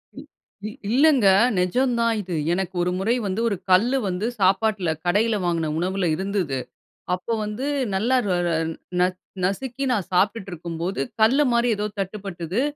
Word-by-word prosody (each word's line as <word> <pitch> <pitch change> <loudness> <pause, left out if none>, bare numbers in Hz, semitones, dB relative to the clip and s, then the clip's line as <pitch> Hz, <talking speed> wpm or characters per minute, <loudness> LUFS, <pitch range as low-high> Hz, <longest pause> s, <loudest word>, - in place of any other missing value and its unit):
இ - - -8 0.5
இ - - -4 0.2
இல்லைங்க 270 -3 +4 0.3
நெஜம் 245 +8 +1
தான் 230 0 +2
இது. 180 -3 -5 0.2
எனக்கு 190 0 -2
ஒரு 180 - 0
முறை 225 +5 +1
வந்து 195 +4 -2
1 200 - -1 0.2
கல்லு 235 +9 +4
வந்து 185 +3 -2
சாப்பாட்டில, 195 -1 +2 0.2
கடையில 210 +5 +2
வாங்கின 165 -3 0
உணவில 185 0 0
இருந்தது. 190 -8 -2 0.5
அப்போ 185 +6 -2
வந்து 210 +6 -4 0.3
நல்லா 235 +7 +2
ர 185 - +1
ர - - +1 0.5
ந - - +5 0.4
நசுக்கி 250 +7 -3
நான் 200 -7 -1
சாப்பிட்டுட்ருக்கும்போது, 180 -4 -1 0.2
கல்லு 270 +7 +5
மாரி 235 +1 +2
எதோ 210 - -1
தட்டுப்பட்டுது. 195 0 -3
195 Hz, 145 wpm, -23 LUFS, 180-230 Hz, 0.5 s, ந